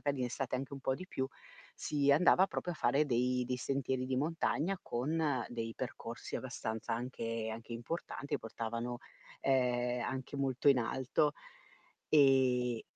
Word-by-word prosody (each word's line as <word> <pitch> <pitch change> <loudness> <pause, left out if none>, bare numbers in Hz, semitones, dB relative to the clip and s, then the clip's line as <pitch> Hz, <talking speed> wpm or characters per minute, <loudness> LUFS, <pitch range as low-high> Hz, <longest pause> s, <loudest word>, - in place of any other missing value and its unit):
magari 140 -2 -1
in 125 - +1
estate 130 +1 -2
anche 135 +2 -5
un 140 - -6
po' 130 - +1
di 185 +7 -7
più, 130 -7 -2 0.5
si 145 -1 +1
andava 180 +5 +6
proprio 180 -2 -3
a - - -9
fare 140 +4 +3
dei 125 -1 +1
dei 125 - -1
sentieri 130 -1 -1
di 130 0 0
montagna, 165 +5 0
con 150 +7 -1 0.3
dei 115 -1 -4
percorsi 120 -2 -5
abbastanza 110 -4 -3
anche 115 -2 -3
anche 115 +1 -8
importanti, 140 +4 -3
portavano, 115 +2 -4 0.4
ehm, 125 -2 +2
anche 130 +2 -4
molto 135 -1 -1
in 135 -3 +7
alto. 130 +5 +1 0.8
Eh 130 -5 +4
130 Hz, 150 wpm, -34 LUFS, 120-140 Hz, 0.8 s, in